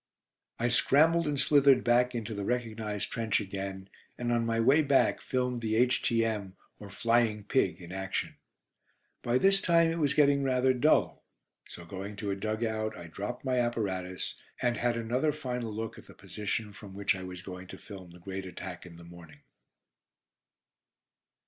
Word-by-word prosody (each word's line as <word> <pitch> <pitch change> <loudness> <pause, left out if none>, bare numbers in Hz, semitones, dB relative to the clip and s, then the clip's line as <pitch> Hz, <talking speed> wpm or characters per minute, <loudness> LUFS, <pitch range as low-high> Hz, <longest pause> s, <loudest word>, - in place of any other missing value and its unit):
I 120 +1 +1
scrambled 160 +7 +4
and 145 -2 -1
slithered 140 -2 +5
back 125 +1 +3
into 115 -1 -3
the 100 -1 -4
recognised 110 -3 -2
trench 110 -2 0
again, 95 -1 -5 0.3
and 120 -1 -2
on 120 -1 +1
my 115 0 0
way 135 +7 +5
back 140 -2 +3
filmed 125 -2 -1
the 110 -1 -1
H.T.M., 115 -4 +1 0.2
or 105 - -10
"Flying 115 0 +1
Pig," 100 -6 +1
in 85 -1 -10
action. 95 0 -3 0.9
By 120 +1 +1
this 195 +6 +4
time 165 -1 +4
it 165 - -3
was 140 -3 +2
getting 140 -1 +4
rather 130 -1 +2
dull, 145 +5 +2 0.5
so 85 - -10
going 95 +3 -7
to 100 0 -3
a - - -1
dug 110 +3 -2
out, 110 -1 -2
I 85 - -9
dropped 105 +10 -6
my 130 -1 +1
apparatus, 95 -7 -2 0.3
and 120 -1 +1
had 120 -1 0
another 125 +6 0
final 125 -6 -4
look 110 +1 -5
at - - -16
the - - -14
position 105 0 -4
from 100 -2 -11
which 100 0 +1
I 95 - -7
was 90 -1 -7
going 90 0 -8
to - - -9
film 95 -4 -11
the 85 - -14
great 95 +2 -6
attack 90 0 -8
in 85 - -13
the 85 - -12
morning. 85 -3 -14
115 Hz, 175 wpm, -30 LUFS, 95-125 Hz, 0.9 s, slithered